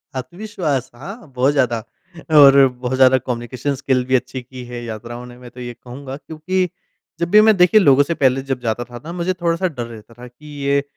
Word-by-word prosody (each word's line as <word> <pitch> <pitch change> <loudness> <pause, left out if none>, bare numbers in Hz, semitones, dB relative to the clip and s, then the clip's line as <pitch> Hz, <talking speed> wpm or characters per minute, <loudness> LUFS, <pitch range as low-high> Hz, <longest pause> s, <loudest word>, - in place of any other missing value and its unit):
आत्मविश्वास 145 - -3
हाँ 195 - -10
बहुत 130 +3 +3
ज़्यादा 120 -5 0 0.6
और 140 -1 +8
बहुत 130 +1 -2
ज़्यादा 130 0 +6
कम्युनिकेशन 125 +3 -4
स्किल 130 -2 0
भी 130 - +1
अच्छी 130 0 -2
की 125 0 -11
है, 120 0 -7
यात्राओं 120 +2 -7
ने 125 0 -13
मैं 125 -1 -12
तो 125 - -14
ये 120 -1 -6
कहूँगा। 130 +3 -9
क्योंकि 180 +4 -2 0.5
जब 170 0 -1
भी 210 0 +8
मैं 220 -1 +5
देखिए, 180 +5 +5
लोगों 140 -4 +5
से 170 - -2
पहले 135 -3 +2
जब 130 - -1
जाता 120 0 -2
था 120 0 -11
ना 165 - -7
मुझे 180 +1 -1
थोड़ा-सा 170 +1 -1
डर 125 -8 -5
रहता 115 0 -13
था, 120 +2 -12
कि 125 +5 -19 0.2
ये 140 0 +2
130 Hz, 210 wpm, -19 LUFS, 125-160 Hz, 0.6 s, और